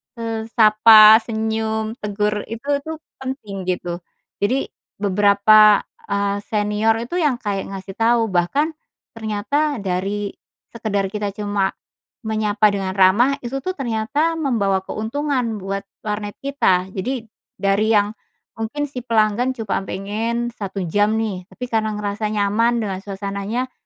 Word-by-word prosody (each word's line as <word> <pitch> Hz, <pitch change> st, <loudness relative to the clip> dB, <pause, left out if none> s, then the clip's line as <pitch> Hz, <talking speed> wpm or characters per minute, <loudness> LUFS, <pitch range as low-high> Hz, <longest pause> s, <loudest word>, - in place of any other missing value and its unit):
se 230 Hz, -, -7 dB, 0.3 s
sapa, 215 Hz, 0 st, +8 dB
senyum, 220 Hz, +1 st, -2 dB
tegur, 210 Hz, 0 st, -1 dB
itu 230 Hz, +5 st, -8 dB
tuh 315 Hz, +3 st, -6 dB, 0.2 s
penting 210 Hz, -8 st, -6 dB
gitu. 175 Hz, -1 st, -2 dB, 0.4 s
Jadi 255 Hz, +7 st, 0 dB, 0.2 s
beberapa, 205 Hz, +1 st, +5 dB, 0.2 s
eee, 200 Hz, 0 st, 0 dB
senior 210 Hz, +1 st, +1 dB
itu 345 Hz, +10 st, -3 dB
yang 295 Hz, -6 st, +2 dB
kayak 200 Hz, -2 st, -2 dB
ngasih 195 Hz, 0 st, -7 dB
tahu, 225 Hz, -2 st, +3 dB
bahkan 275 Hz, -, +1 dB, 0.4 s
ternyata 225 Hz, +4 st, -1 dB
dari 195 Hz, +2 st, -2 dB, 0.4 s
sekedar 200 Hz, -4 st, -2 dB
kita 210 Hz, -1 st, -2 dB
cuma 205 Hz, -2 st, -1 dB, 0.4 s
menyapa 215 Hz, -1 st, +1 dB
dengan 195 Hz, -2 st, -1 dB
ramah 240 Hz, +9 st, +4 dB
itu 265 Hz, +1 st, -5 dB
tuh 370 Hz, -, -1 dB
ternyata 275 Hz, +4 st, -1 dB
membawa 205 Hz, -11 st, 0 dB
keuntungan 245 Hz, +1 st, -2 dB
buat 195 Hz, 0 st, -5 dB, 0.2 s
warnet 210 Hz, -1 st, -4 dB
kita. 190 Hz, -10 st, +1 dB
Jadi, 230 Hz, +6 st, -3 dB, 0.3 s
dari 200 Hz, +3 st, +2 dB
yang 205 Hz, 0 st, +3 dB, 0.5 s
mungkin 260 Hz, +7 st, -3 dB
si 255 Hz, -, -5 dB
pelanggan 230 Hz, +1 st, +1 dB
cuma 220 Hz, -5 st, -2 dB
pengen 225 Hz, +5 st, -2 dB
1 200 Hz, -4 st, -5 dB
jam 205 Hz, +5 st, +1 dB
nih, 200 Hz, -5 st, -3 dB
tapi 250 Hz, +1 st, -8 dB
karena 220 Hz, -1 st, 0 dB
ngerasa 210 Hz, +1 st, -2 dB
nyaman 210 Hz, +3 st, +1 dB
dengan 190 Hz, -2 st, -3 dB
suasananya 200 Hz, +5 st, -4 dB
215 Hz, 130 wpm, -21 LUFS, 200-235 Hz, 0.5 s, sapa